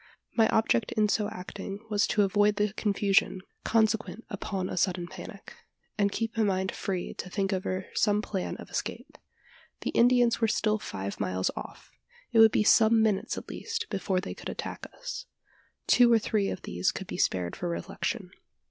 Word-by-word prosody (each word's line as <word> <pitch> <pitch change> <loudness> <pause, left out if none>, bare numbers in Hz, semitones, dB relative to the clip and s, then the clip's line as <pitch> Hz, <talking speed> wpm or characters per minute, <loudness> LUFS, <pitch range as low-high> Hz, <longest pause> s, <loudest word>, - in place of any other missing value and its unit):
My 225 -2 +5
object 220 0 +2
in 215 -1 +2
so 210 0 +1
acting 195 +2 -7
was 205 -1 +3
to 210 - +3
avoid 205 +1 +3
the 210 0 0
confusion, 200 -3 +1 0.2
consequent 225 0 +1
upon 190 -3 -3
a - - -4
sudden 180 -1 0
panic, 190 +2 -10 0.4
and 200 -1 +2
keep 225 +1 -2
my 225 - +1
mind 190 -2 +1
free 185 -3 -3
to 185 - -7
think 195 +1 -1
over 185 0 -2
some 205 0 +2
plan 195 -3 -3
of - - -11
escape. - - -4 0.7
The - - -2
Indians 245 -1 +4
were 225 - +4
still 215 0 +1
five 100 - -5
miles 95 0 0
off. - - -9 0.4
It 230 - +4
would 225 -1 +8
be 210 - +2
some 220 +1 +5
minutes 210 -3 0
at - - -7
least 455 0 -4
before 190 -1 0
they 185 - -5
could - - -8
attack - - -5
us. - - -7 0.6
Two 245 -1 +6
or 230 - +7
three 215 -2 0
of - - -5
these 90 +1 0
could - - -6
be - - -6
spared 90 -2 0
for - - -3
reflection. 85 0 -3
205 Hz, 180 wpm, -28 LUFS, 185-220 Hz, 0.7 s, would